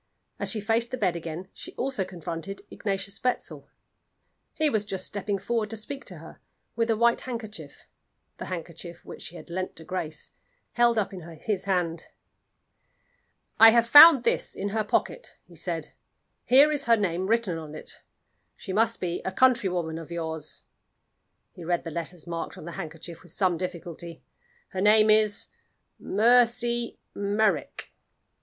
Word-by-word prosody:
As - - -1
she 225 - 0
faced 225 +3 0
the 255 - -4
bed 185 -6 +1
again 170 +2 -6
she - - -9
also 265 -7 -2
confronted 180 +1 -6
Ignatius 200 -1 -3
Wetzel. 250 -1 -2 0.9
He 310 - +2
was 220 -7 +1
just 195 -3 -3
stepping 200 0 -3
forward 225 0 -2
to 225 - -5
speak 275 +6 -7
to - - -8
her, - - -13 0.4
with 230 0 0
a 225 - +2
white 235 +1 +3
handkerchief 225 -4 -8 0.5
the - - -5
handkerchief 170 -1 -7
which - - -9
she 175 - -7
had 175 - -11
lent 185 +1 -3
to 160 - -11
Grace 160 -3 -5 0.4
held 240 -1 +3
up 205 -2 0
in 185 - -7 0.2
his 205 -4 -2
hand. 175 -4 -1 1.5
"I 225 - +11
have 235 +1 +4
found 290 0 +10
this - - 0
in 200 +1 -3
her 215 +1 0
pocket," - - -2
he - - -18
said. - - -4 0.6
"Here 275 +5 +6
is 290 -2 -1
her 230 -1 +5
name 185 -2 -1
written 215 -7 +1
on 155 -1 -9
it. - - -7 0.5
She 190 - -7
must 225 +3 +2
be 175 -1 -2
a 190 - -2
countrywoman 185 -9 +2
of 165 - -10
yours." 160 -3 -5 0.9
He 175 - -11
read 175 +1 0
the 165 - -6
letters 170 +1 -3
marked 170 -1 -5
on - - -10
the 170 - -6
handkerchief 165 -1 -8
with 175 -4 -13
some 185 -3 +2
difficulty. 170 -1 -6 0.5
"Her 190 - -4
name 215 +1 +6
is 215 -1 +3 0.5
Mercy 235 +2 +2 0.2
Merrick." 200 -5 -1
195 Hz, 160 wpm, -27 LUFS, 170-230 Hz, 1.5 s, I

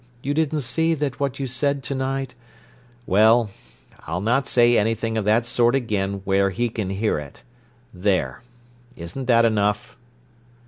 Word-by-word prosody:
You 140 - -1
didn't 155 0 0
see 160 +6 0
that 145 -4 -3
what 140 -2 -2
you 135 - -2
said 135 +2 -1
to 140 - -3
night—" 135 -1 -3 0.7
"Well, 110 +2 +4 0.6
I'll 80 +3 -2
not 120 +7 +1
say 120 -1 +4
anything 115 +1 0
of 110 -2 -1
that 110 +3 +3
sort 120 +1 +2
again 100 -6 -1
where 100 0 +2
he 120 +6 -1
can 110 -4 -4
hear 95 -3 -1
it. 75 -1 -11 0.5
There, 95 +1 -1 0.6
isn't 85 +11 -6
that 115 -2 +4
enough?" 105 0 0
115 Hz, 150 wpm, -22 LUFS, 100-135 Hz, 0.7 s, Well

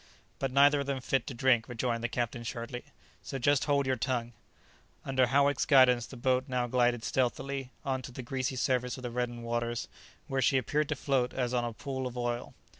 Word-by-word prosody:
"But 135 - 0
neither 140 +2 +5
of 140 - -3
them 140 -1 -1
fit 130 0 0
to 135 - -5
drink," 120 -2 +3
rejoined 120 -1 -2
the 120 - 0
captain 120 0 -2
sharply, 120 +2 -5 0.4
"so 135 - -5
just 140 +2 +2
hold 140 -2 +2
your 130 -1 +1
tongue!" 120 -1 -2 0.7
Under 130 -2 +2
Howick's 140 +3 +2
guidance 125 -4 +5
the 130 - -10
boat 130 +1 +1
now 125 -2 0
glided 120 -1 +1
stealthily 135 +1 -1 0.2
on 130 -1 -1
to 125 - -8
the 125 +1 -7
greasy 130 +1 -2
surface 125 0 0
of 130 - -10
the 120 - -4
reddened 120 -1 -3
waters, 120 0 -2 0.4
where 135 0 -1
she 135 +2 +4
appeared 145 +4 0
to 150 - 0
float 130 -2 0
as 125 -1 -1
on 120 -1 +1
a 120 - -2
pool 130 +1 -4
of 125 0 -8
oil. 120 0 -3
125 Hz, 205 wpm, -30 LUFS, 120-135 Hz, 0.7 s, neither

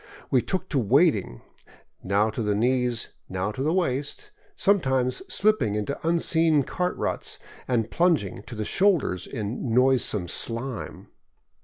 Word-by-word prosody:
We 130 - +4
took 185 +6 -3
to 140 - +1
wading, 100 - +2 0.6
now 100 +3 +1
to 110 - -4
the 105 -2 0
knees, 125 +1 +1 0.2
now 95 +2 -2
to 120 - -6
the 150 +3 +1
waist, 175 - -2 0.2
sometimes 130 - +2
slipping 175 - +2
into 105 +7 -2
unseen 160 -2 +2
cart 180 +6 -2
ruts - - -2 0.3
and 115 -3 0
plunging 165 - +1
to 120 - -7
the 110 -1 -3
shoulders 165 - +1
in 115 +2 -3
noisome 125 -7 +3
slime. 115 +5 -5
125 Hz, 135 wpm, -25 LUFS, 110-160 Hz, 0.6 s, We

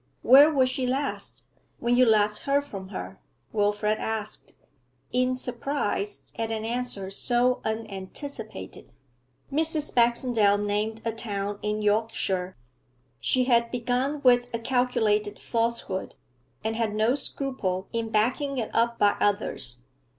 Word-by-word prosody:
'Where 280 +5 +8
was 265 -4 +3
she 255 0 -1
last 275 +3 -3 0.3
when 240 +1 +1
you 250 0 +5
last 210 -1 +3
heard 280 +1 +2
from 195 -8 -8
her?' 195 - -7 0.3
Wilfrid 210 0 +1
asked, 215 -1 -3 0.6
in 255 0 +2
surprise 245 -5 -2 0.2
at 225 -1 -1
an 220 -1 -3
answer 230 -5 -3
so 245 +4 +2
unanticipated. 220 - -6 0.6
Mrs. 310 0 +2
Baxendale 235 -3 +3
named 210 +2 -2
a 230 - +1
town 205 -2 -4
in 210 0 -2
Yorkshire. 205 -3 0 0.6
She 255 - +2
had 235 -2 +3
begun 250 +4 -1
with 245 -1 +4
a - - +1
calculated 230 -4 +1
falsehood, 230 -5 -2 0.5
and 220 +1 -1
had 220 -2 -1
no 220 +3 +3
scruple 260 -9 -2
in 230 -1 -2
backing 255 +6 0
it 230 -3 -3
up 235 +1 +2
by 205 - +4
others. 125 - 0
225 Hz, 130 wpm, -26 LUFS, 210-250 Hz, 0.6 s, Where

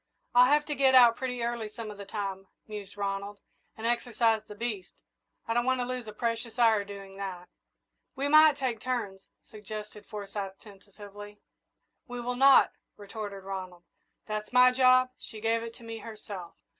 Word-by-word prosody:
"I'll 250 +2 +6
have 295 0 +4
to 295 - -2
get 265 -1 +4
out 240 -2 +8
pretty 250 -2 -3
early 235 -2 -2
some 215 0 -7
of 205 - -12
the 200 - -8
time," 195 -2 -4 0.2
mused 205 -2 -8
Ronald, 200 0 -3 0.4
"and 220 - -6
exercise 235 -2 +2
the 210 - -9
beast. 210 -4 -4 0.6
I 230 - 0
don't 240 +1 +2
want 260 0 +2
to 245 - 0
lose 250 -2 -4
a - - -6
precious 230 +1 -3
hour 225 -4 +4
doing 195 -1 -10
that." 185 -3 -6 0.7
"We 275 +1 -1
might 310 0 +7
take 255 -5 -2
turns 215 -6 -3 0.2
" - - -53
suggested 210 0 -8
Forsyth, 200 -2 -6
tentatively. 205 0 -12 0.7
"We 245 -1 -6
will 245 +1 -2
not," 270 +1 +6 0.3
retorted 205 -1 -7
Ronald. 185 -2 -7 0.4
"That's 215 0 -4
my 250 0 +7
job 255 0 +5
she 220 - -9
gave 225 +1 +1
it 230 0 -7
to - - -15
me 225 0 -7
herself." 210 -5 -9
220 Hz, 175 wpm, -29 LUFS, 200-245 Hz, 0.7 s, out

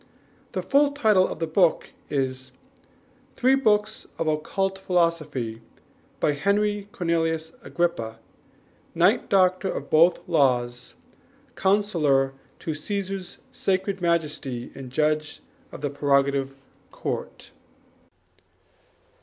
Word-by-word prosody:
The - - -2
full 285 +1 +3
title 215 -9 +4
of - - -6
the 165 - -1
book 165 +1 +2 0.2
is 130 -2 -2 0.8
Three 255 +2 +3
Books 215 -5 +1
of 165 - -1
Occult 190 +5 -1
Philosophy, 165 -11 0 0.6
by - - +2
Henry 200 +6 0
Cornelius 165 -2 -1
Agrippa, 115 -11 -2 0.8
Knight, - - +3
Doctor 185 0 +3
of - - -6
both 170 +3 +4
Laws, 125 -6 +1 0.6
Counsellor 165 -10 +2 0.2
to 160 - -4
Caesar's 195 +3 -4
Sacred 190 0 -1
Majesty 150 -7 -1
and 135 -2 -9
Judge 155 +1 0 0.3
of - - -9
the 145 -2 -2
Prerogative 140 -1 +1 0.4
Court. - - -5
165 Hz, 100 wpm, -25 LUFS, 140-195 Hz, 0.8 s, title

